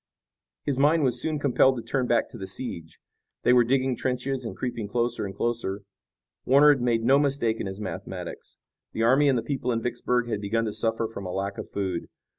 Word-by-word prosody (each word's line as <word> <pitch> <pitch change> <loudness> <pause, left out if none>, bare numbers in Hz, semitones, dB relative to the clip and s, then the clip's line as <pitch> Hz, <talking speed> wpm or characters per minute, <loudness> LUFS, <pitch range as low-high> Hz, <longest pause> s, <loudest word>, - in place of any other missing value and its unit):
His 135 -2 -1
mind 150 +3 +4
was 125 -3 +2
soon 155 -1 -1
compelled 135 -2 +3
to 115 - -5
turn 125 +2 -1
back 120 - +2
to - - -10
the 95 - -5
siege. 85 -6 -5 0.5
They 125 - +5
were 125 -1 +6
digging 130 +1 +1
trenches 130 +2 -2
and 115 - -6
creeping 120 -4 -3
closer 120 -1 -1
and 95 - -8
closer. 105 -4 -2 0.6
Warner 140 +3 +6
had 135 - -4
made 115 -2 +1
no 135 +4 +5
mistake 135 -6 +1
in - - -3
his 95 +1 -6
mathematics. 105 -3 -7 0.4
The 115 - -1
army 135 +5 +5
and 130 - +3
the 115 - -1
people 130 -3 -2
in 115 - 0
Vicksburg 120 0 0
had 105 -3 -2
begun 115 +3 0
to 105 - -3
suffer 115 0 0
from 100 -4 -7
a - - -4
lack 100 +1 -3
of - - -7
food. 95 -4 -3
120 Hz, 215 wpm, -26 LUFS, 110-130 Hz, 0.6 s, were